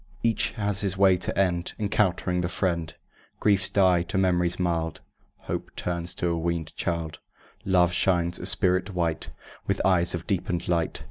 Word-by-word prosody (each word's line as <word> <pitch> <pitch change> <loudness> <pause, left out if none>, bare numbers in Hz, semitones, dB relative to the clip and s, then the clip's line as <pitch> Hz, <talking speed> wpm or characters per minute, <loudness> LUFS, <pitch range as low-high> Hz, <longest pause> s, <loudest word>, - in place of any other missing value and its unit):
Each 115 -1 +1
has 100 -2 -1
his 95 -2 -1
way 95 -1 +5
to 90 - -3
end, 90 -3 0
Encountering 95 -3 0
this 85 +1 -3
friend. 85 -4 -1 0.5
Griefs 100 -3 +2
die 95 -3 +3
to 90 +2 -3
memories 90 -2 +1
mild; 85 -3 -1 0.4
Hope - - -4
turns 85 0 -2
a - - -4
weanèd 85 -1 -2
child; 85 -2 -3 0.5
Love 90 -2 +3
shines 90 -1 +1
a - - -2
spirit 90 +1 +1
white, 85 -3 -1 0.4
With - - 0
eyes 90 -2 +3
of 85 -1 -6
deepened 90 -2 -2
light. 85 -2 0
90 Hz, 155 wpm, -26 LUFS, 85-95 Hz, 0.5 s, way